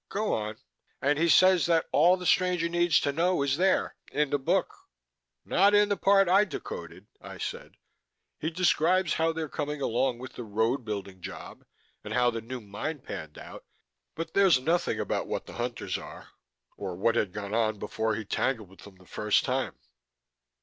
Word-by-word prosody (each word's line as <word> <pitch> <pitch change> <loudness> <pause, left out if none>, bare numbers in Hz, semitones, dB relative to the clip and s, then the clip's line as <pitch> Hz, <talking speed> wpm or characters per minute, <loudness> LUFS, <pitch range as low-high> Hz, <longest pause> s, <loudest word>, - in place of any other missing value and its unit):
"Go 210 +1 -1
on." 105 0 -3 0.4
"And 145 +2 +1
he 170 +1 +3
says 185 +3 +5
that 165 -1 +2
all 175 +5 +5
that - - -13
the - - -5
stranger 180 -1 +2
needs 175 -2 +3
to 140 - 0
know 170 +1 +1
is 140 0 0
there 185 +2 +1
in 150 -1 0
the 145 - +1
book." 135 - 0 0.7
"Not 200 +3 +4
in 205 0 +4
the 205 - +2
part 195 0 +4
I 195 +4 +5
decoded," 415 - -7 0.2
I - - -9
said. 480 +2 -6 0.7
"He 160 - -1
describes 180 +1 +2
how 165 0 +1
they're 160 -1 -4
coming 150 0 -4
along 125 -1 0
with 130 +1 -9
the 120 - -7
road 110 +5 0
building 100 -4 -6
job, - - -9 0.4
and - - -5
how 125 -1 +3
the 115 -1 -4
new 125 +2 -7
mine 105 +10 -5
panned 80 - -8
out - - -10 0.5
but 165 - -5
there's 195 -8 +5
nothing 165 +6 0
about - - -2
what - - -3
the - - -11
Hunters 120 0 -3
are, - - -11 0.5
or 95 -3 -5
what 115 +6 +2
had 105 -5 0
gone 100 0 -6
on 110 -2 +1
before 110 +2 -2
he 110 0 -5
tangled 110 -1 -1
with 95 - -19
them 100 -2 -13
the 90 0 -20
first - - +1
time." - - -1
145 Hz, 190 wpm, -28 LUFS, 110-175 Hz, 0.7 s, says